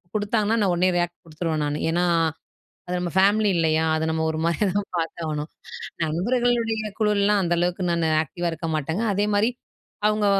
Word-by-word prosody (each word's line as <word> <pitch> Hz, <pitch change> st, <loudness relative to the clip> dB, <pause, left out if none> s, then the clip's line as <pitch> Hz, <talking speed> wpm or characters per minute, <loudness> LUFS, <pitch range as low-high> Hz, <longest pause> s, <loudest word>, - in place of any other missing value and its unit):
குடுத்தாங்கன்னா, 215 Hz, +1 st, +1 dB
நான் 190 Hz, -3 st, +2 dB
உடனே 180 Hz, +2 st, +2 dB
ரியாக்ட் 175 Hz, 0 st, -2 dB
குடுத்துடுவேன் 155 Hz, -1 st, -2 dB
நானு. 145 Hz, +1 st, -2 dB
ஏனா 175 Hz, +1 st, +1 dB, 0.8 s
அது 180 Hz, -, -2 dB
நம்ம 175 Hz, -1 st, -2 dB
ஃபேமிலி 205 Hz, +2 st, +4 dB
இல்லயா? 160 Hz, -1 st, +2 dB
அத 160 Hz, -, -1 dB
நம்ம 160 Hz, 0 st, 0 dB
ஒருமாரியா 165 Hz, +5 st, 0 dB
தான் 205 Hz, -1 st, -1 dB
பார்த்தாகணும் 160 Hz, -2 st, -3 dB, 0.6 s
நண்பர்களுடைய 225 Hz, +5 st, 0 dB
குழுலாம் 210 Hz, -1 st, +3 dB
அந்த 175 Hz, 0 st, +1 dB
அளவுக்கு 175 Hz, +1 st, 0 dB
நான் 170 Hz, 0 st, 0 dB, 0.2 s
ஆக்டிவ் 175 Hz, +4 st, -6 dB
ஆ -, -, +1 dB
இருக்க 165 Hz, +1 st, -5 dB
மாட்டேங்க. 160 Hz, +8 st, -2 dB
அதேமாதிரி 205 Hz, +3 st, +2 dB, 0.6 s
அவுங்க 210 Hz, 0 st, +1 dB
180 Hz, 155 wpm, -24 LUFS, 165-210 Hz, 0.8 s, ஃபேமிலி